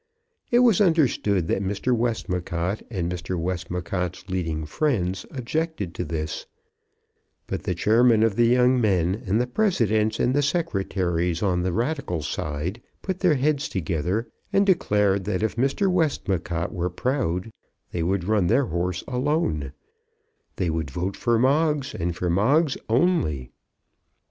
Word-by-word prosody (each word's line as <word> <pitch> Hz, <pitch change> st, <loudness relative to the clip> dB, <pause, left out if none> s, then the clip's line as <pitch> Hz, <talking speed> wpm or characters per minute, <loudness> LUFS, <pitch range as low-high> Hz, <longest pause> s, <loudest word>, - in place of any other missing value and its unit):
It 245 Hz, +1 st, +5 dB
was 220 Hz, -5 st, +4 dB
understood 130 Hz, -, +2 dB
that 95 Hz, -, +1 dB
Mr. 100 Hz, +6 st, 0 dB
Westmacott 95 Hz, -5 st, -2 dB
and 95 Hz, -7 st, -2 dB
Mr. 90 Hz, +1 st, -3 dB
Westmacott's 90 Hz, +1 st, -3 dB
leading 80 Hz, -5 st, -2 dB
friends 95 Hz, -, -1 dB
objected 130 Hz, -, -3 dB
to 90 Hz, -, -3 dB
this; 80 Hz, -1 st, -4 dB, 1.0 s
but -, -, -5 dB
the -, -, -1 dB
chairmen 115 Hz, +1 st, +4 dB
of 115 Hz, -3 st, +2 dB
the 120 Hz, +1 st, +4 dB
young 125 Hz, +1 st, +4 dB
men, 95 Hz, -1 st, +1 dB
and 100 Hz, +4 st, +2 dB
the 125 Hz, -, +2 dB
presidents 115 Hz, -, +1 dB
and 125 Hz, -, +2 dB
the 145 Hz, -, +3 dB
secretaries 95 Hz, -, -1 dB
on 90 Hz, -3 st, +1 dB
the 90 Hz, +1 st, 0 dB
Radical 115 Hz, -, -2 dB
side 75 Hz, +8 st, -3 dB, 0.2 s
put 190 Hz, -1 st, -3 dB
their 180 Hz, -6 st, +3 dB
heads 145 Hz, +1 st, 0 dB
together, 90 Hz, +5 st, -1 dB, 0.2 s
and 200 Hz, -, +3 dB
declared 105 Hz, -, +2 dB
that 105 Hz, 0 st, -1 dB
if 110 Hz, -, -1 dB
Mr. 135 Hz, -, +1 dB
Westmacott 95 Hz, -, 0 dB
were 90 Hz, -1 st, -1 dB
proud 95 Hz, -, -1 dB, 0.4 s
they 85 Hz, -, -2 dB
would 90 Hz, +2 st, 0 dB
run 100 Hz, -2 st, +2 dB
their 125 Hz, +8 st, +3 dB
horse 90 Hz, 0 st, -2 dB
alone; 125 Hz, -, 0 dB, 0.8 s
they 85 Hz, -3 st, 0 dB
would 80 Hz, -3 st, -2 dB
vote 90 Hz, +6 st, -3 dB
for 120 Hz, -2 st, +1 dB
Moggs, 145 Hz, +2 st, +2 dB
and 85 Hz, 0 st, -2 dB
for 90 Hz, -, -2 dB
Moggs 135 Hz, -, +3 dB
only. 110 Hz, -, +1 dB
100 Hz, 145 wpm, -24 LUFS, 90-130 Hz, 1.0 s, It